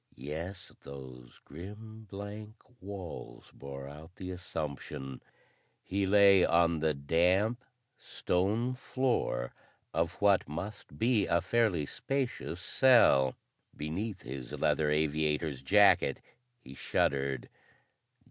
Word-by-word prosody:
Yes, 85 +9 -6
those 65 -3 -11
grim 105 +7 -10
blank 105 +2 -7 0.3
walls 95 -10 -8
bore 70 0 -8
out 75 +5 -12
the 95 -1 -6
assumption. 75 -6 -5 0.6
He 95 +1 -1
lay 100 -1 +6
on 85 -1 +3
the 80 -1 +1
damp 90 - +2 0.4
stone 105 +8 0
floor 125 - -1 0.4
of 85 +2 -1
what 100 -7 +3
must 95 +8 -7
be 115 -3 +2
a 85 - +3
fairly 95 -4 +1
spacious 130 - -3
cell. 90 - +5 0.4
Beneath 90 +6 -4
his 65 -1 -7
leather 75 -1 +1
aviator's 75 -1 0
jacket 65 - +4 0.4
he 65 - -12
shuddered. 70 0 0
85 Hz, 100 wpm, -31 LUFS, 70-100 Hz, 0.6 s, lay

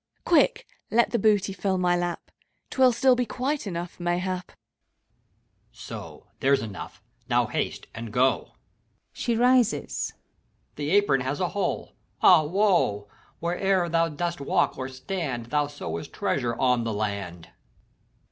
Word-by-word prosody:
Quick, 345 +9 +3 0.2
let 235 +1 +3
the 235 - +1
booty 205 -2 +2
fill 190 0 -1
my 180 -1 +2
lap! 175 0 -3 0.4
'T 265 - -2
will 255 -1 +7
still 255 +2 +4
be 245 -1 -1
quite 265 +3 -2
enough, 175 -1 -5
mayhap. 180 +1 -1
HAVEQUICK. - - -22 1.2
So! - - -9
there's 135 -3 +3
enough! 100 -5 -8 0.3
Now - - +3
haste, - - -3
and 115 -1 -7
go! 130 +4 +1 0.6
(She 235 -2 -1
rises.) 245 -1 +2 0.6
The 145 0 -3
apron 190 -8 +3
has 130 +3 -2
a 180 -2 0
holci 200 -3 -2 0.3
ah - - +8
woe 160 - +1
I. - - -28 0.3
Wherever 180 +1 +1
thou 165 0 +2
dost 170 +1 -3
walk 140 - +1
or 130 0 -5
stand, 130 -3 -4
Thou 150 -1 +2
sowest 85 - -6
treasure 120 -1 -1
on 125 -2 +2
the 115 -1 -2
land. 100 -5 -4
175 Hz, 145 wpm, -26 LUFS, 130-200 Hz, 1.2 s, ah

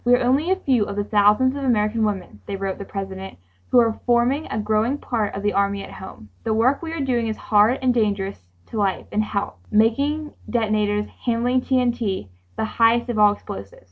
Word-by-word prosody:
"We 245 +1 +5
are 245 - 0
only 275 +7 +2
a 380 - +4
few 260 - +1
of 200 - -5
the 205 - -1
thousands 210 +6 +3
of 280 - -4
American 220 -3 +1
women," 190 - -3
they - - -3
wrote 195 -1 -3
the 200 - -6
President, 195 -1 -6 0.3
"who 250 - +5
are 225 -2 +2
forming 245 +5 +2
a - - -4
growing 215 +5 +1
part 225 -7 -2
of 200 - -5
the 205 - +1
army 200 0 0
at - - -10
home. 150 - -11
The 220 - 0
work 250 +5 +2
we 330 -1 -5
are 330 - -4
doing 245 -4 0
is 220 - -3
hard 215 +4 +3
and 255 -1 +3
dangerous 200 - -1 0.3
to - - -4
life 195 -2 0
and 215 - +1
health, 205 -1 -3
making 280 +8 +1 0.2
detonators, 210 -3 +1 0.2
handling 245 +2 +1
TNT, 240 - 0 0.3
the - - -1
highest 230 +2 +2
of 230 -3 -1
all 210 -1 +6
explosives. 100 - -9
220 Hz, 205 wpm, -22 LUFS, 205-245 Hz, 0.3 s, all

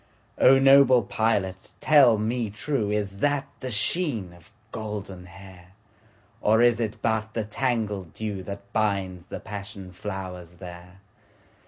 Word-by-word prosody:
O 135 +1 +7
noble 135 -2 +6
pilot 100 -4 -1
tell 135 -7 +6
me 115 +1 -1
trueIs 105 -4 -2
that 145 +3 +1
the 130 - -5
sheen 110 - 0
of 85 -2 -18 0.2
golden 100 -4 -6
hair? 90 -1 -14 0.7
Or 110 +2 +4
is 120 -1 +4
it 110 -2 -3
but 110 -1 -1
the 115 - 0
tangled 105 - -2
dewThat 100 -2 -5
binds 95 -4 -1
the - - -6
passion 100 -2 -8
flowers 90 -2 -7
there? 90 +1 -11
105 Hz, 125 wpm, -25 LUFS, 95-115 Hz, 0.7 s, O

